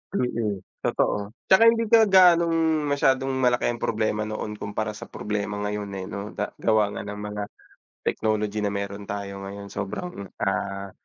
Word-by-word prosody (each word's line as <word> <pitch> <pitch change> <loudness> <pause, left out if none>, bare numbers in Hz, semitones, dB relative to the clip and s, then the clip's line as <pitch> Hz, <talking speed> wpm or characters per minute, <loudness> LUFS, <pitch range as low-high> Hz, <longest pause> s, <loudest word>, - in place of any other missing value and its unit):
Mm, 110 - -1 0.2
totoo. - - +1 0.4
'Tsaka 190 +4 +8
hindi 230 0 +5
ka 225 -1 +7
gaanong 165 -4 +5
masyadong 135 -2 +2 0.2
malaki 125 -1 +3
ang 120 -1 -2
problema 110 -1 0
noon 105 0 -4
kumpara 105 +1 -3
sa - - -8
problema 105 -1 -3
ngayon, 105 0 -3
eh, 95 - -5
'no 100 +1 -6
da - - -2
gawa 105 -2 +2
nga - - -4
ng 105 0 -6
mga 105 0 -4 0.6
technology 105 -1 0
na 105 - 0
mayro'n 100 0 -4
tayo 100 -1 -5
ngayon 100 +1 -8
sobrang, 100 - -5 0.2
ah, 100 0 -2
105 Hz, 160 wpm, -25 LUFS, 100-130 Hz, 0.6 s, Tsaka